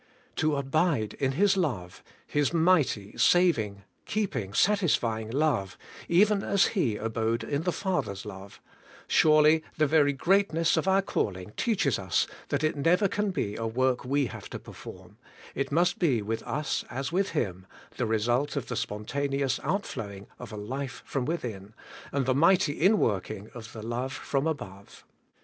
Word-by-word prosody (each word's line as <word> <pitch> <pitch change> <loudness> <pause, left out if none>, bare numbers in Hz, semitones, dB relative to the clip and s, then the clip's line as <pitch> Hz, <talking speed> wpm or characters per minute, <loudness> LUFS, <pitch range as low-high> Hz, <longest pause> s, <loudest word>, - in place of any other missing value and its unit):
To 155 -2 +2
abide 140 - 0
in 135 -1 +1
His 195 +6 +3
love. 120 - -2 0.2
His 145 -2 0
mighty, 160 - +2
saving, 115 - +3 0.2
keeping, 195 - -2
satis 200 -5 +3
fying 110 -2 -3
love, 130 -9 0 0.3
even 200 +4 +4
as 195 0 +2
He 140 - +1
abode 115 +1 -1
in 145 0 -2
the 180 +2 0
Father's 175 - -2
love, 100 -1 -10 0.3
— - - -21
surely 155 0 +5
the 155 - +4
very 145 -1 +4
greatness 165 +2 +2
of - - 0
our 190 +1 +4
calling 95 - -2
teaches 165 - +1
us 95 -2 +1 0.2
that - - -1
it 155 - +1
never 170 +7 +3
can 210 -1 -1
be 105 - -2
a 115 - -3
work 125 +2 0
we 140 +2 +1
have - - -8
to - - -5
perform; - - -12 0.3
it 140 - -2
must 175 +4 +2
be 130 - +2
with 110 +2 -3
us 150 +1 -1
as 135 +4 -4
with 190 +2 0
Him, 95 -6 -2 0.3
the - - 0
result 120 +7 0
of 140 - -3
the - - -2
spontaneous 135 +5 -2
outflowing 105 - -3
of - - -8
a 105 - -7
life 130 +6 -5
from 135 -3 -2
within, 110 - -4 0.4
and 140 -2 0
the 130 - +2
mighty 165 +2 +4
in 195 +8 +3
working 100 - -2
of 115 -2 -9
the 110 - -8
love 120 +3 -3
from 140 +2 -1
above. 100 -11 -6
140 Hz, 165 wpm, -28 LUFS, 110-165 Hz, 0.4 s, surely